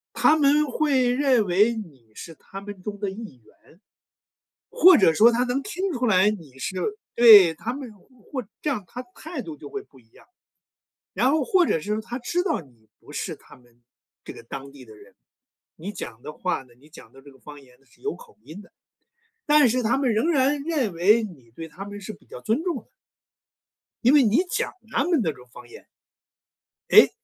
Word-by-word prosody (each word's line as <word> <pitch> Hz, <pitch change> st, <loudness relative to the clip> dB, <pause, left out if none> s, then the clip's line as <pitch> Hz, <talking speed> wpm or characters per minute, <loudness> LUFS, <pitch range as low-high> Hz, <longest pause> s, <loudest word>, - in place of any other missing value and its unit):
他 310 Hz, +1 st, +4 dB
们 295 Hz, +1 st, +3 dB
会 265 Hz, -2 st, +1 dB
认 250 Hz, -4 st, +2 dB
为， 205 Hz, +6 st, +3 dB
你 140 Hz, -, -10 dB
是 165 Hz, +6 st, -10 dB
他 195 Hz, +6 st, -11 dB
们 200 Hz, -2 st, -10 dB
中 205 Hz, -1 st, -6 dB
的 200 Hz, -, -2 dB
一 195 Hz, -, -10 dB
员。 165 Hz, -, -24 dB, 1.0 s
或 370 Hz, -6 st, +8 dB
者 165 Hz, -5 st, +4 dB
说 230 Hz, +6 st, +6 dB
他 240 Hz, +2 st, +1 dB
能 255 Hz, +3 st, -2 dB
听 385 Hz, -2 st, -3 dB
出 250 Hz, -2 st, -3 dB
来， 200 Hz, 0 st, +4 dB
你 155 Hz, -11 st, -9 dB
是 185 Hz, -, -5 dB, 0.4 s
对， 205 Hz, -8 st, +8 dB
他 235 Hz, +9 st, -5 dB
们 265 Hz, -3 st, -8 dB
或 250 Hz, +4 st, -10 dB, 0.2 s
这 305 Hz, -, -3 dB
样， 215 Hz, -9 st, -2 dB
他 250 Hz, +6 st, -8 dB
态 315 Hz, -3 st, -7 dB
度 160 Hz, -9 st, -8 dB
就 145 Hz, 0 st, -11 dB
会 205 Hz, -, -6 dB
不 135 Hz, -, -22 dB
一 110 Hz, -, -29 dB
样。 -, -, -21 dB, 0.9 s
然 260 Hz, -, +2 dB
后， 310 Hz, -2 st, +1 dB
或 360 Hz, +4 st, +3 dB
者 165 Hz, -, 0 dB
是 205 Hz, +7 st, -6 dB
说， 215 Hz, -, -2 dB
他 240 Hz, +2 st, -6 dB
知 350 Hz, +9 st, -1 dB
道 345 Hz, -, -1 dB
你 120 Hz, -8 st, -19 dB
不 -, -, -16 dB
是 -, -, -4 dB
他 -, -, -18 dB
们 120 Hz, -1 st, -26 dB, 0.4 s
这 -, -, -9 dB
个 -, -, -12 dB
当 135 Hz, +3 st, -9 dB
地 135 Hz, -2 st, -14 dB
的 110 Hz, -2 st, -15 dB
人， -, -, -18 dB, 0.6 s
你 195 Hz, +6 st, -7 dB
讲 120 Hz, -, -8 dB
的 150 Hz, -, -8 dB
话 180 Hz, -7 st, -3 dB
呢 125 Hz, -2 st, -23 dB
你 150 Hz, +3 st, -21 dB
讲 -, -, -15 dB
的 135 Hz, -, -16 dB
这 140 Hz, 0 st, -16 dB
个 135 Hz, -, -20 dB
方 145 Hz, +1 st, -12 dB
言 125 Hz, -1 st, -22 dB
呢， 135 Hz, -, -31 dB
是 -, -, -27 dB
有 420 Hz, +1 st, -3 dB
口 -, -, -17 dB
音 175 Hz, +7 st, -11 dB
的。 -, -, -19 dB, 0.8 s
但 295 Hz, -3 st, +5 dB
是 250 Hz, +2 st, 0 dB
他 235 Hz, +5 st, +1 dB
们 255 Hz, -5 st, +1 dB
仍 260 Hz, +11 st, +1 dB
然 280 Hz, -1 st, +2 dB
认 280 Hz, -, -1 dB
为， 210 Hz, +7 st, +3 dB
你 135 Hz, -, -11 dB
对 165 Hz, 0 st, -8 dB
他 190 Hz, +5 st, -10 dB
们 205 Hz, 0 st, -8 dB
是 205 Hz, +2 st, -8 dB
比 -, -, -20 dB
较 -, -, -10 dB
尊 230 Hz, +9 st, -1 dB
重 355 Hz, -2 st, -2 dB
的。 -, -, -12 dB, 1.2 s
因 250 Hz, +5 st, +5 dB
为 295 Hz, -, +7 dB
你 245 Hz, -, +3 dB
讲 -, -, -2 dB, 0.2 s
他 -, -, +1 dB
们 335 Hz, -7 st, +2 dB
那 160 Hz, -, 0 dB
种 125 Hz, -4 st, -16 dB
方 125 Hz, -1 st, -13 dB
言。 -, -, -14 dB, 1.0 s
诶， -, -, +8 dB
210 Hz, 230 characters per minute, -24 LUFS, -, 1.2 s, 或